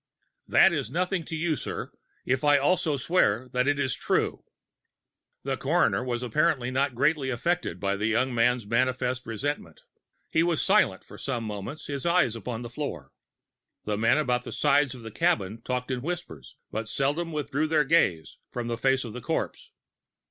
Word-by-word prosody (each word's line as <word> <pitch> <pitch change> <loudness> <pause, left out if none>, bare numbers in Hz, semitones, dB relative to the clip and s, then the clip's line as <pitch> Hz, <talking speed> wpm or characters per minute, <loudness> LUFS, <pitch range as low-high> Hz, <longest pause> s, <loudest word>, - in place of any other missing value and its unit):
"That - - +6
is - - -2
nothing 180 +3 -1
to 165 - -5
you, 160 0 0
sir, - - -5 0.3
if 130 +1 0
I 145 -1 +6
also 155 +1 +2
swear 130 - +2
that 125 +1 0
it 145 0 +2
is 135 -2 0
true." - - -1 1.0
The 135 -1 -2
coroner 150 -1 +2
was 125 -1 -2
apparently 130 0 +1
not 135 0 0
greatly 140 +1 +2
affected 130 - -1
by 100 +1 0
the 105 +2 0
young 120 +3 +1
man's 120 0 +2
manifest 125 +2 0
resentment. 115 - -4 0.5
He 160 - +3
was 170 -2 +1
silent 195 - +3
for - - -13
some 125 -4 -2
moments, 105 +7 -6
his 140 -2 -3
eyes 170 -9 +3
upon 115 +1 -5
the 120 - -6
floor. 115 - -5 0.7
The 105 - -1
men 115 +5 +3
about 125 -5 +1
the - - -7
sides 145 -2 +2
of 120 - -11
the 110 - -7
cabin 115 - 0
talked 125 +1 -3
in 125 -1 -2
whispers, 135 - -6 0.2
but 110 0 -3
seldom 145 +7 0
withdrew 150 0 -1
their 155 -1 +3
gaze 135 - +1
from 120 -1 -4
the 115 -1 -3
face 135 +1 +2
of 115 -3 -7
the 125 - -6
corpse. - - -3
130 Hz, 175 wpm, -27 LUFS, 115-150 Hz, 1.0 s, That